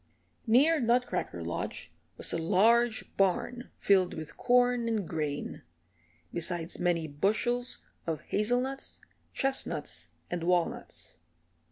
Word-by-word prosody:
Near 290 +8 +5
Nutcracker 240 - 0
Lodge 85 +1 -4 0.3
was - - +2
a - - +1
large 220 +7 +3
barn 195 +6 0
filled 190 -3 +3
with 155 -1 -7
corn 245 -1 +3
and 215 -6 -1
grain, 150 -3 -3 0.7
besides 170 0 +2
many 175 -2 +1
bushels 215 - 0 0.3
of 160 -2 -2
hazelnuts, 245 +6 -1 0.4
chestnuts 270 -1 -2 0.2
and 175 -1 -2
walnuts. 175 -1 -1
205 Hz, 100 wpm, -30 LUFS, 170-245 Hz, 0.7 s, Near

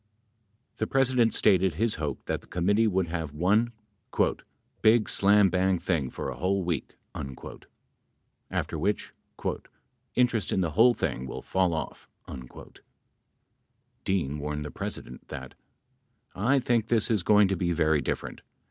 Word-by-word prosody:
The - - -1
President 130 -4 +3
stated 95 -4 +3
his 110 +3 +1
hope 75 -3 -4
that - - -2
the - - -20
committee 100 +6 +2
would 95 -4 0
have 80 -4 -4
one 105 +9 +2 1.1
"big 110 0 +5
slambang 95 -2 +3
thing 80 -9 -1
for - - -5
a - - -8
whole 95 +6 0
week," 85 -5 -3 1.5
after 80 - -3
which 100 +6 -1 1.0
"interest 120 -5 +1
in 95 - +1
the 85 -3 -1
whole 115 +8 +5
thing 65 +1 -2
will - - -7
fall 90 -3 +1
off." 80 - -6 0.2
31 65 -2 -10 1.3
Dean 80 -7 -1
warned 75 0 -4
the 75 - -6
President 65 +1 -7
that: 65 -2 -8 0.8
I 120 +9 +2
think 120 -3 +1
this 115 -2 +1
is 105 -4 +2
going 105 +3 +5
to 95 - +1
be 85 -1 -1
very 80 -3 +2
different. - - -4
95 Hz, 140 wpm, -27 LUFS, 80-110 Hz, 1.5 s, big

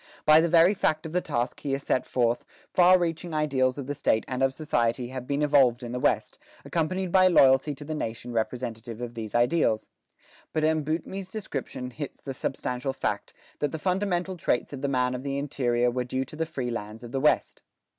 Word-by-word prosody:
By 155 +1 +7
the 170 - +1
very 170 +3 +6
fact 155 -5 0
of 160 - -5
the 180 - +2
task 120 -6 -2
here 135 -1 -1
set 130 -2 -1
forth, 120 -1 +1 0.3
far 180 +1 +7
reaching 170 -1 -2
ideals 135 -4 +1
of 140 - -4
the 145 - -3
state 110 -5 +1
and 130 0 -3
of 135 0 +3
society 120 -4 -1
have 130 -1 -6
been 140 +1 0
evolved 135 -4 +4
in 120 - -5
the 125 - -3
West, - - 0 0.3
accompanied 180 +3 -1
by 185 0 +6
loyalty 140 -3 +5
to 145 - -10
the 155 - -4
nation 120 -4 -4
representative 115 -1 -3
of 120 -1 -5
these 110 -2 -6
ideals. 120 -2 +2 0.6
But 155 - 0
M. 155 0 +2
Boutmy's 175 +5 -4
description 135 -11 -5
hits 145 +2 -7
the 135 - -6
substantial 130 +1 -3
fact, - - -3 0.2
that 145 -2 0
the - - -3
fundamental 185 +1 -1
traits 145 -4 0
of 135 - -6
the 140 - 0
man 125 -2 +1
of 125 - -4
the 140 0 -3
interior 125 -4 +1
were 125 +1 -1
due 130 +2 -2
to 145 - -11
the 160 +1 -2
free 130 -6 -3
lands 110 0 -6
of 120 - -8
the 135 - -1
West. 150 - +2
135 Hz, 205 wpm, -27 LUFS, 125-160 Hz, 0.6 s, By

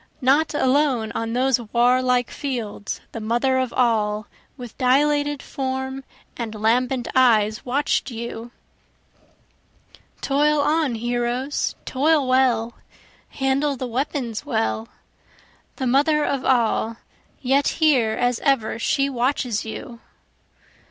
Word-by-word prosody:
Not 285 +5 +2
alone 260 -5 +1
on 225 0 -3
those 255 0 +2
warlike 245 +2 +2
fields 235 -7 -5
the 230 - -6
Mother 240 +4 +1
of 255 -2 -1
All, 215 -4 +1 0.3
With 245 -3 -9
dilated 290 +2 +2
form 265 0 -4 0.3
and 225 -2 -5
lambent 245 +3 +1
eyes 220 -4 +3
watch'd 275 +2 0
you. 235 0 -6 1.7
Toil 295 +2 +2
on 295 -3 +1
heroes! 240 +4 -2
toil 290 +1 +2
well! 245 -3 +2 0.6
handle 275 +1 0
the 255 - -4
weapons 245 -2 -3
well! 110 0 -1 0.9
The 265 - -3
Mother 295 +4 +3
of 275 -2 -1
All, 230 -2 +1 0.4
yet 275 +2 +2
here 265 -9 +2
as 245 0 0
ever 250 -6 0
she 275 +4 +1
watches 250 -3 -1
you. 230 +2 -8
255 Hz, 110 wpm, -22 LUFS, 230-275 Hz, 1.7 s, eyes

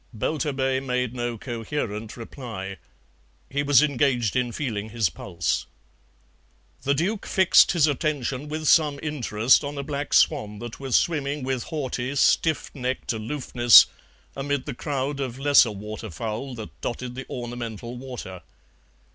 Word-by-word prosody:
Belturbet 135 +1 -1
made 125 -2 -1
no 120 -1 -3
coherent 115 -2 -4
reply; 110 -5 -7 0.7
he 140 +1 0
was 145 -1 +5
engaged 130 -6 +1
in 125 -1 +1
feeling 110 -5 -3
his 110 -6 0
pulse. 85 0 -2 1.1
The 140 +1 +1
Duke 195 +8 -1
fixed 190 -2 +5
his 165 -4 +4
attention 145 -2 -1
with 155 +1 -4
some 150 -2 +4
interest 125 -6 +2
on 145 0 -5
a 140 - -3
black 145 0 -2
swan 105 0 +3
that 120 +1 -8
was 135 -3 -1
swimming 145 -3 +1
with 130 -2 -2
haughty, 135 -3 -3
stiff 160 +3 +2
necked 130 -2 -2
aloofness 120 +1 +6 0.5
amid 140 0 -2
the - - -4
crowd 140 +1 -3
of 130 -3 -3
lesser 140 -3 +5
water 105 +1 -7
fowl 110 - -5
that 110 -2 -10
dotted 125 +1 -4
the 130 +1 -8
ornamental 120 -1 -6
water. 120 -8 -8
130 Hz, 140 wpm, -25 LUFS, 115-145 Hz, 1.1 s, aloofness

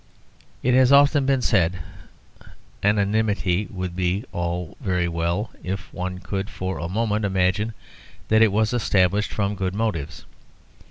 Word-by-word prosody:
As 125 - +3
has 130 0 +5
often 140 0 +5
been 135 -2 +2
said, 90 -5 +2 1.0
anonymity 105 -2 +1
would 90 -2 -5
be 90 +3 0
all 85 0 -3
very 90 -6 0
well 85 +5 -2
if 95 -1 -5
one 90 +1 -4
could 95 +1 -4
for 95 0 -4
a 85 - -4
moment 105 +1 0
imagine 95 +3 0 0.5
that 110 0 +4
it 110 -2 +5
was 110 +3 +1
established 105 -3 +2
from 100 -1 -1
good 95 -1 -3
motives. 85 -9 -3
100 Hz, 140 wpm, -23 LUFS, 90-110 Hz, 1.0 s, has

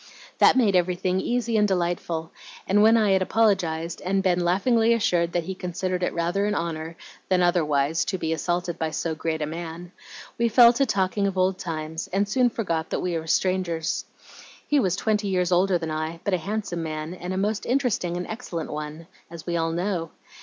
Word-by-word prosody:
"That - - +6
made 215 -7 +3
everything 180 +1 +1
easy 235 -2 0
and 210 -1 +4
delightful, 175 -3 -2 0.3
and 205 +2 +3
when 225 +2 +6
I 215 -3 +3
had 190 0 +3
apologized 180 -6 +1
and 195 +1 0
been 180 -2 +2
laughingly 225 +6 +3
assured 175 -6 +1
that 175 - 0
he 190 - -4
considered 185 0 -3
it 180 - 0
rather 175 +4 0
an 210 - 0
honor 165 -1 -4 0.3
than 185 -1 +3
otherwise 155 -3 +2
to 190 - -2
be 160 -2 -1
assaulted 175 +2 -2
by 160 - 0
so 160 +1 -2
great 160 0 -2
a - - 0
man, 165 +2 -7 0.5
we 235 0 +3
fell 235 +1 +7
to 275 +3 +1
talking 200 -1 +1
of 195 -1 -3
old 185 0 +1
times, 160 -1 -4
and 200 +2 +1
soon 250 +3 +3
forgot 170 -9 -2
that - - -2
we 180 -2 -1
were 160 0 -4
strangers. 180 -1 0 0.6
He 295 - +3
was 185 -8 +1
twenty 210 0 0
years 180 -2 0
older 180 +1 +3
than 165 -2 -4
I, 155 +2 -3
but 200 - -1
a 180 - +2
handsome 200 -1 -3
man, 155 +1 -4
and 180 0 -6
a 185 - -2
most 205 +2 -1
interesting 240 -9 0
and 180 - -3
excellent 220 -8 -5
one, 150 +2 -6 0.2
as 165 -1 -10
we 175 - -2
all 165 -1 0
know. 175 -1 -2
180 Hz, 200 wpm, -25 LUFS, 165-200 Hz, 0.6 s, fell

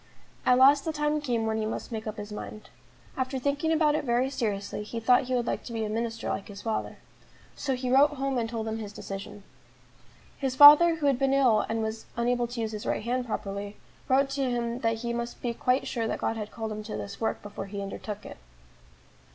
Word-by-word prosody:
At 250 - +6
last 275 +2 +6
the 320 - -1
time 300 0 0
came 240 -5 -1
when 220 0 0
he 220 - -1
must 220 - -5
make 220 -1 -5
up 215 +1 -5
his 210 0 -7
mind. 215 0 -8 0.4
After 260 +1 -2
thinking 285 +4 0
about 310 -2 +3
it 305 - 0
very 250 +1 +1
seriously, 210 -7 -2
he 220 +2 -5
thought 250 +3 +4
he 255 0 -1
would 240 -1 0
like - - -2
to 235 - -7
be 225 -1 -1
a - - -4
minister 230 +1 -3
like 200 - -3
his 205 -1 -10
father. 225 -1 -3 0.6
So 270 -2 -1
he 250 0 -3
wrote 290 +3 +5
home 270 -2 -1
and 225 -1 -2
told 225 -2 -3
them 220 0 -3
his 210 -2 -7
decision. 200 +1 -7 1.0
His 265 -2 -1
father 300 +5 +9
who 315 -2 -3
had 275 -3 +3
been 270 0 +2
ill 245 -6 +3
and 225 0 -1
was 220 0 -5
unable 240 0 +1
to 240 0 -5
use 220 -1 -2
his 215 -1 -6
right - - -1
hand 245 +2 -1
properly, 200 -1 -4 0.3
wrote 270 +1 +3
to 275 -2 0
him 240 0 -2
that 225 -2 0
he 235 - -1
must 235 0 -4
be 240 -1 -2
quite 250 +3 +1
sure 230 -2 -2
that - - -2
God 225 - -1
had 215 -1 -5
called 220 -1 -5
him 215 0 -4
to 215 - -5
this 200 +2 -7
work 225 - -1
before 205 -1 -7
he 200 +1 -6
undertook 200 +1 -6
it. - - -9
235 Hz, 235 wpm, -28 LUFS, 220-265 Hz, 1.0 s, father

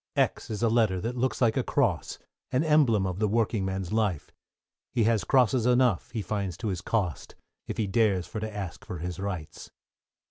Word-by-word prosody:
=X= - - 0
is 110 +1 -3
a - - +5
letter 110 -5 +2
that 115 +5 -3
looks 130 +2 -1
like 115 -2 +3
a 130 - +2
cross, 120 - 0 0.3
An 130 +4 +2
emblem 140 -11 +4
of 90 0 -3
the 110 - +2
working 110 -1 +1
man's 95 0 -3
life; 105 -8 0 0.6
He 120 - +1
has 110 -3 +2
crosses 125 +1 +3
enough, 125 -6 +3
he 110 -3 -4
finds 95 -2 -3
to 110 - -3
his 90 -3 -3
cost; 95 -7 -2 0.3
If - - -4
he 110 - +1
dares 100 -3 +2
for 110 - -6
to 110 0 -4
ask 100 -5 -6
for 90 - -6
his 85 +2 -5
rights. 95 -6 -5
110 Hz, 200 wpm, -28 LUFS, 95-115 Hz, 0.6 s, a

